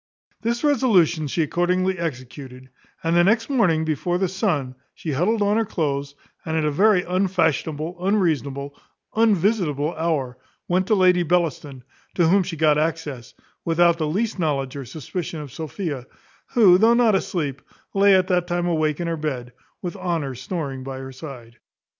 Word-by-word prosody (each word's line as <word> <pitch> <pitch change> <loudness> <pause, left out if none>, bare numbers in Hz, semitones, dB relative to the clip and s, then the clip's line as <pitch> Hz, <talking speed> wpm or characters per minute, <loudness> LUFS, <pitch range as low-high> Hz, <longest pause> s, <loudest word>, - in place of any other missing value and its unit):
This 235 +3 -1
resolution 190 - +3
she 165 +4 0
accordingly 180 +3 0
executed; 130 -3 -6 0.3
and 165 +1 +1
the 175 - +5
next 230 +7 +2
morning 170 - +2
before 160 +3 -1
the 190 +1 +1
sun, 175 - -1 0.2
she 160 - -5
huddled 200 +10 +1
on 205 +1 +2
her 225 - +2
cloaths, 140 -7 -2 0.3
and 160 0 -2
at 155 - +1
a 150 - +1
very 195 +4 +4
unfashionable, 175 -3 -1
unseasonable, 145 -8 0 0.4
unvisitable 190 -8 +2
hour, 145 -7 -2 0.3
went 185 +1 +1
to 215 - +3
Lady 180 -2 +4
Bellaston, 155 -6 -1 0.3
to 170 -3 +3
whom 195 +4 +4
she 175 -3 -5
got 150 -1 +3
access, 155 -6 -3 0.3
without 170 0 +3
the 155 - 0
least 205 +6 -1
knowledge 140 -5 -1
or 140 -2 -6
suspicion 160 +5 -5
of 145 -4 -9
Sophia, 155 -5 -5 0.5
who, 190 -7 +7
though 230 +3 +5
not 235 -3 +4
asleep, 150 -8 -2 0.3
lay 200 0 +5
at 185 -1 +2
that 180 -1 +1
time 175 0 -1
awake 155 -3 0
in 175 - -2
her 165 -1 -2
bed, 130 -5 -4 0.3
with 175 -2 -4
Honour 165 -7 -2
snoring 135 0 -5
by 135 0 -6
her 135 0 -7
side. 125 -4 -10
165 Hz, 165 wpm, -23 LUFS, 145-185 Hz, 0.5 s, who